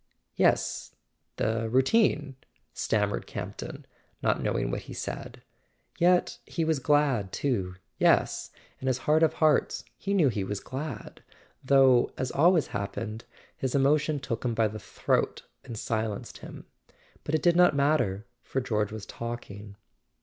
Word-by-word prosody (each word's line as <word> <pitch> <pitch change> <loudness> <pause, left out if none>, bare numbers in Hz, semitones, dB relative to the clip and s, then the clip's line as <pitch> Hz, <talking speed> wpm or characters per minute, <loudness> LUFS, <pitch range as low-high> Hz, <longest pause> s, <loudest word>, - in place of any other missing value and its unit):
"Yes—the 110 0 -1
routine 140 - +2 0.2
" - - -42
stammered - - 0
Campton, - - -7 0.4
not - - +2
knowing - - -1
what - - -3
he - - -10
said. - - -6 0.6
Yet 175 +1 +3
he 165 - -1
was 160 -3 +1
glad 135 -8 +2
too; 100 -10 -1 0.2
yes, - - +3 0.3
in 130 - -5
his 130 -2 +2
heart 150 +4 +2
of 160 - +4
hearts 155 -2 +2
he 200 0 -2
knew 160 -8 +4
he 105 -5 -2
was 100 +1 -3
glad; 130 -2 -7 0.4
though, 130 -2 +5
as 130 - -2
always 165 +2 +4
happened, 105 +2 -5 0.3
his 130 0 -2
emotion 145 +2 +2
took 120 -4 -4
him 120 -3 -1
by 110 -1 +3
the 110 +1 -7
throat - - -1 0.2
and 115 - -7
silenced 110 -2 -3
him. - - -10 0.6
But 155 - -1
it 155 - -1
did 175 -1 +4
not 180 -4 +5
matter, 140 -9 +1 0.2
for 135 - -2
George 105 -5 -1
was 110 -2 -7
talking. 105 -4 -7
130 Hz, 145 wpm, -28 LUFS, 110-150 Hz, 0.6 s, though